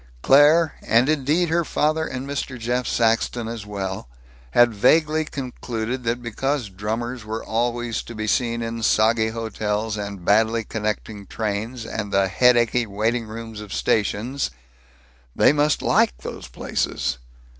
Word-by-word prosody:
Claire, 150 +4 +6
and 115 +3 +3
indeed 155 +3 +1
her 170 +1 +2
father 155 +1 0
and 130 +1 -5
Mr. 140 -2 -4
Jeff 125 +2 -1
Saxton 115 0 +1
as 115 -3 -6
well, 95 -8 -5 0.4
had 120 - +4
vaguely 155 +8 +3
concluded 125 -3 -4
that 120 +1 -1
because 130 +1 -2
drummers 110 +5 -4
were 110 +1 -5
always 120 0 -1
to 120 - -10
be 110 0 -3
seen 115 +1 0
in 115 0 -4
soggy 110 0 +3
hotels 110 -1 -2
and 100 -3 -6
badly 110 +2 +3
connecting 105 -1 -4
trains 110 +3 -3
and 110 -2 -4
the 95 -1 +3
headachy 120 +2 +3
waiting 110 +3 -1
rooms 110 0 -7
of 105 -2 -10
stations, 110 +8 0 0.9
they - - +5
must 150 0 +1
like - - +3
these 60 - -8
places. 60 +1 -2
115 Hz, 140 wpm, -23 LUFS, 105-125 Hz, 0.9 s, Claire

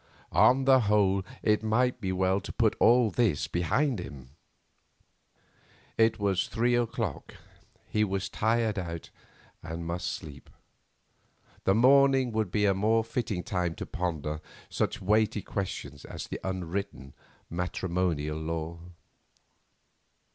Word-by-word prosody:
On 125 - +4
the 135 -1 +6
whole 100 -3 +2 0.2
it 105 -1 +3
might 120 +3 +1
be 95 - -1
well 95 +1 +1
to - - -7
put 115 -3 +2
all 120 -2 +5
this 100 -9 +1
behind 115 - 0
him. 65 -7 -9 1.6
It 115 0 +3
was 95 -2 0
three 120 +1 +1
o'clock, 115 - -2 0.5
he 105 - +1
was 100 -1 -1
tired 110 0 0
out, 85 -2 -6 0.5
and 80 +1 -6
must 85 0 -2
sleep. 70 -2 -9 1.2
The 95 - +4
morning 135 +1 +5
would 110 -3 -1
be 105 +3 +1
a 100 - +4
more 110 +4 +2
fitting 110 -5 -3
time 90 -2 -2
to - - -6
ponder 80 -4 -3 0.3
such - - -1
weighty 105 +1 +2
questions 70 -8 -5
of - - -7
the - - -4
unwritten 95 -5 -4 0.3
matrimonial 85 -3 -2
law. 80 +1 -4
95 Hz, 125 wpm, -28 LUFS, 85-110 Hz, 1.6 s, the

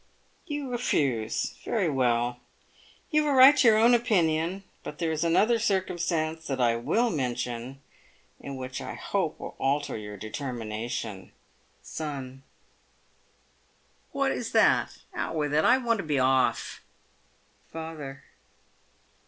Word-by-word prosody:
You 290 -2 -3
refuse. 135 - -1
Very 210 -6 0
well; 120 -3 +1 0.7
you 305 -1 +3
have 295 - +1
a - - +2
right 265 +3 +9
to 245 - +5
your 220 -1 +6
own 230 +3 +5
opinion. 185 -6 +1 0.2
But 150 - -8
there 165 0 -1
is 155 +1 -1
another 210 +8 +3
circumstance 175 -6 -1
that 135 -2 -2
I 120 -2 +3
will 170 - +1
mention, 125 -1 -3 0.6
and 140 -1 -6
which 130 0 -5
I - - -6
hope - - -2
will - - -7
alter 140 +2 0
your 105 -1 -7
determination. 110 -3 -5 0.5
Son. 135 -4 -6 1.7
What - - +1
is - - -4
that? - - +3 0.2
Out - - -3
with 150 -2 -1
it, 155 +1 +3
I 250 - +6
want 235 -4 0
to - - -2
be 150 -3 -1
off. 130 0 +1 0.9
Father. 155 -4 -7
150 Hz, 130 wpm, -27 LUFS, 130-195 Hz, 1.7 s, right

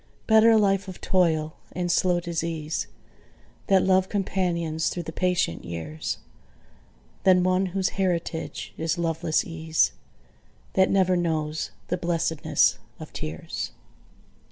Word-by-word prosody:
Better 220 0 +6
a 225 - +6
life 195 -1 +2
of 185 - -8
toil 160 -4 +1 0.2
and 175 -1 -1
slow 180 0 +3
disease 165 -2 -3 0.8
That 190 -2 +4
LOVE 190 0 +3
companions 170 -5 0
through 175 - -4
the 160 - -6
patient 180 - 0
years, 80 -2 -4 1.1
Than 185 -1 +5
one 185 +1 +2
whose 190 +1 0
heritage 175 -4 -2
is 165 +2 0
loveless 165 -1 0
ease, 160 -1 +1 0.8
That 190 0 +4
never 185 -2 +3
knows 160 -3 -1 0.2
the 180 - 0
blessedness 170 -2 +1 0.2
of - - -10
tears. 75 +1 -5
175 Hz, 120 wpm, -25 LUFS, 160-185 Hz, 1.1 s, Better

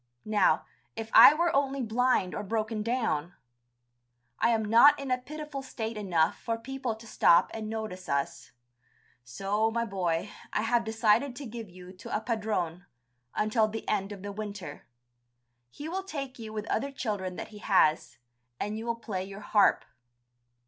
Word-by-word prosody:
Now, 215 -1 +3 0.3
if 225 0 -6
I 295 - +10
were 340 0 +1
only 275 -1 +1
blind 230 -4 +1
or - - -3
broken 220 +1 -2
down! 210 -9 -1 1.0
I - - +3
am 225 -2 +1
not 235 +7 +7
in 275 -2 -4
a 255 - +3
pitiful 300 +1 -7
state 225 -4 -5
enough 175 -6 +1
for 230 -1 -2
people 260 -1 -4
to 220 +1 -14
stop 170 -5 +4
and 215 -1 -5
notice 215 -5 -5
us. 140 0 -2 0.7
So, 195 - -1
my 235 +1 -1
boy, 185 -2 -2 0.2
I 210 - 0
have 230 +1 +2
decided 225 +4 +2
to 280 - -7
give 230 -3 -7
you 180 +1 -12
to 185 - -4
a - - -3
padrone, 205 -7 -2 0.5
until 215 +1 +2
the 220 +1 -6
end 200 -1 -1
of 200 -2 -8
the 205 - -5
winter. 200 -7 -7 0.8
He 290 - -8
will 370 +4 -2
take 275 -10 -6
you 220 -1 -7
with 215 -1 -4
other 275 +5 -1
children 205 -8 -3
that - - -6
he 210 -1 -11
has, 165 -7 +2 0.4
and 210 +2 -3
you 230 - -6
will 235 - 0
play 205 -5 -4
your 195 +1 -9
harp...." 205 0 +3
220 Hz, 170 wpm, -29 LUFS, 195-240 Hz, 1.0 s, I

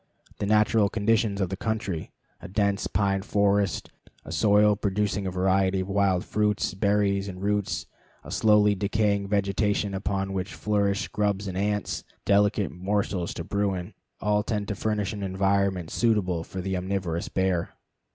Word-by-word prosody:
The 100 - -1
natural 105 0 +3
conditions 110 -1 +1
of 95 - 0
the 95 - -3
country 105 -5 -3 0.3
a - - -8
dense 100 0 0
pine 95 +1 +1
forest; 100 0 +1 0.3
a - - -8
soil 105 0 +4
producing 100 -1 -1
a - - -2
variety 95 +1 +2
of 95 - -5
wild 95 -2 +2
fruits, 105 -2 0
berries, 100 0 +1
and 90 -2 -7
roots; 100 -7 -1 0.4
a - - -10
slowly 105 -1 +4
decaying 100 0 0
vegetation 100 0 0
upon 95 0 -2
which 95 0 -3
flourish 100 -1 0
grubs 100 -1 -1
and 95 - -4
ants, 105 +1 -1 0.2
delicate 100 0 +3
morsels 95 -1 -1
to 85 - -4
Bruin 100 0 -2 0.3
all 105 0 +2
tend 105 -1 -2
to 105 - -2
furnish 105 0 -1
an 105 - -6
environment 95 -2 0
suitable 100 -8 +1
to 95 - -6
the 95 +1 -2
omnivorous 90 -2 -2
bear. 95 -3 -1
100 Hz, 150 wpm, -26 LUFS, 95-105 Hz, 0.4 s, soil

